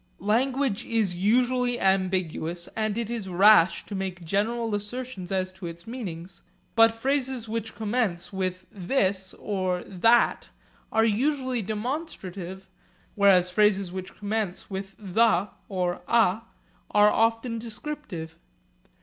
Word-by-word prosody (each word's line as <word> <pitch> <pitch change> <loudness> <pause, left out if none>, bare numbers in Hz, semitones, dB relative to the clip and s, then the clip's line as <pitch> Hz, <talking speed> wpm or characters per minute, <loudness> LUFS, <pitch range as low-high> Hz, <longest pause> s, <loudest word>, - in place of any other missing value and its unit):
Language 245 +3 +1
is 220 -5 +1
usually 245 +6 +2
ambiguous 185 -3 0
and 215 -1 -1
it 235 -2 -1
is 225 -4 -4
rash 185 -2 +5
to - - -8
make 190 -3 -4
general 225 +5 0
assertions 205 -2 -5
as 185 -1 -1
to 185 -2 -7
its 170 0 -9
meanings. 185 -8 -7 0.3
But 225 0 +7
phrases 260 -1 -1
which 225 0 -4
commence 210 -5 -1
with 185 -1 -3
'this' 190 -1 -1
or 185 -3 -2
'that' 225 +6 +2 0.4
are 225 0 +3
usually 255 +2 0
demonstrative, 200 - -5 0.5
whereas 190 -3 +4
phrases 200 -2 +3
which 185 +1 -7
commence 205 -2 -3
with 195 0 -5
'the' 200 -1 +2 0.2
or 180 -3 -1
'a' 225 -3 +3 0.5
are 210 0 +5
often 225 +1 +1
descriptive. 225 - -6
205 Hz, 120 wpm, -26 LUFS, 185-230 Hz, 0.5 s, But